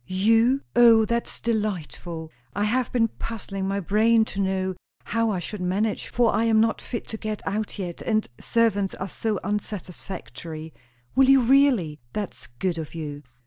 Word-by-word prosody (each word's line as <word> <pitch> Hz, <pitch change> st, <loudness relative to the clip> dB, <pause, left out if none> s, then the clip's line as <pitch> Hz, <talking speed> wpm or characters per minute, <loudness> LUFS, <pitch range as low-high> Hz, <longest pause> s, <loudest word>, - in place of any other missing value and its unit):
"You? 225 Hz, +8 st, +3 dB
O, 230 Hz, -2 st, +7 dB
that's 235 Hz, +1 st, -2 dB
delightful. 175 Hz, -7 st, -3 dB, 0.2 s
I 205 Hz, -, +1 dB
have 240 Hz, +4 st, +1 dB
been 230 Hz, -2 st, +3 dB
puzzling 195 Hz, -4 st, -5 dB
my 200 Hz, +1 st, 0 dB
brain 220 Hz, +4 st, +3 dB
to 195 Hz, -, -1 dB
know 190 Hz, -1 st, 0 dB, 0.3 s
how 230 Hz, 0 st, 0 dB
I 200 Hz, -, 0 dB
should 180 Hz, +3 st, -5 dB
manage; 200 Hz, +4 st, 0 dB
for 240 Hz, -2 st, +2 dB
I 225 Hz, -, +2 dB
am 220 Hz, -1 st, +4 dB
not 225 Hz, 0 st, +2 dB
fit 235 Hz, -, -5 dB
to 220 Hz, -, -4 dB
go 215 Hz, 0 st, -3 dB
out 215 Hz, +2 st, -2 dB
yet, 180 Hz, -4 st, -5 dB
and 215 Hz, -1 st, 0 dB
servants 210 Hz, -4 st, +1 dB
are 190 Hz, -, -4 dB
so 215 Hz, +2 st, -2 dB
unsatisfactory. 180 Hz, -5 st, -5 dB, 0.4 s
Will 265 Hz, 0 st, +5 dB
you 270 Hz, -1 st, +7 dB
really? 240 Hz, -, +4 dB
That's 205 Hz, -3 st, -5 dB
good 165 Hz, +8 st, -2 dB
of 160 Hz, +1 st, -7 dB
you!" 145 Hz, -3 st, -5 dB
210 Hz, 165 wpm, -25 LUFS, 185-230 Hz, 0.4 s, O